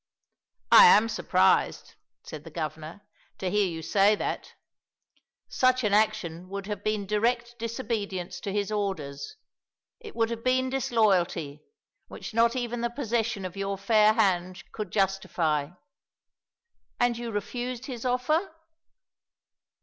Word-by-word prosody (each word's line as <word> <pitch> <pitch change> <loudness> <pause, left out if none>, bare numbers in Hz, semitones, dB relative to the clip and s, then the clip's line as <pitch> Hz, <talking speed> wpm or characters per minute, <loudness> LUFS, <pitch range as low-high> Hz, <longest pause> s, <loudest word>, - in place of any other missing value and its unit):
"I - - +10
am 225 - +6
surprised," 225 - +1 0.3
said - - -9
the - - -10
Governor, 155 +3 -6 0.4
"to 185 -1 -3
hear 205 -1 +2
you 165 -2 -6
say 200 +5 +3
that; - - -5 0.9
such 255 0 +2
an 210 -2 +1
action 190 -5 0
would 200 0 -5
have 205 -1 -5
been 215 -1 -1
direct 235 +4 -1
disobedience 210 -6 -4
to 200 - -5
his 205 +1 -2
orders. 155 -10 -4 0.6
It 445 -3 -11
would 225 0 0
have 230 0 -5
been 255 0 +1
disloyalty, 190 - +1 0.5
which - - -9
not 230 +1 +3
even 240 -1 -3
the 235 - 0
possession 230 -5 -2
of 185 0 -6
your 195 0 -3
fair 215 +2 +4
hand 185 -4 0
could 210 -3 -5
justify. 170 -7 0 1.3
And 245 -1 +2
you 235 0 -5
refused 240 +4 -4
his 245 -4 -7
offer?" 305 +8 0
210 Hz, 130 wpm, -27 LUFS, 190-235 Hz, 1.3 s, I